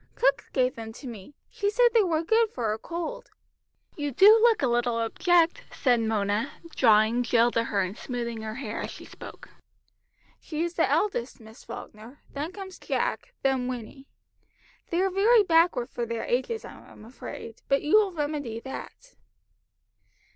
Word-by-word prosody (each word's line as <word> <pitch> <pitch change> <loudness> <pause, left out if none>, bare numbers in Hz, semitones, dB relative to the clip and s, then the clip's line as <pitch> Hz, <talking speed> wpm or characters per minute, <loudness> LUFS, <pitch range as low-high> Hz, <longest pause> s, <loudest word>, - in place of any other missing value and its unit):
Cook - - +2
gave 255 -1 +1
them 225 -1 -8
to 270 - -12
me. 235 +2 -9 0.2
She 405 - -1
said 485 +3 +4
they 460 - +6
were 330 -5 0
good 450 +5 +3
for 230 - -2
a 220 - -6
cold." 335 +5 -6 0.7
"You 290 -1 -2
do 390 - +7
look 460 -7 +4
a - - +4
little 240 0 +1
object," 340 - +2 0.2
said 245 -3 +3
Mona, 220 +2 -1 0.2
drawing 220 0 +4
Jill 240 0 +3
to 230 0 0
her, 205 -3 0
and 185 +2 -5
smoothing 235 -2 -5
her 220 0 -5
hair 230 -5 -5
as - - -4
she - - -10
spoke. - - -12 0.9
"She 310 0 -4
is 345 0 -3
the - - +1
eldest, 280 - 0
Miss 220 0 -14
Falkner, 220 +6 -10 0.2
then 295 +4 -4
comes 380 -1 -9
Jack, - - -2
then 265 -2 +1
Winnie. 255 +2 -7 0.8
They 345 +2 +1
are 385 - +1
very 425 +4 +5
backward 330 -8 +3
for 240 -1 -3
their 230 0 -3
ages, 260 - -1
I - - -9 0.2
am 215 - -14
afraid, 230 -1 -9
but 275 - +2
you 305 +8 +5
will 415 -3 +3
remedy 290 -8 -3
that." 385 - -9
265 Hz, 170 wpm, -27 LUFS, 230-350 Hz, 0.9 s, do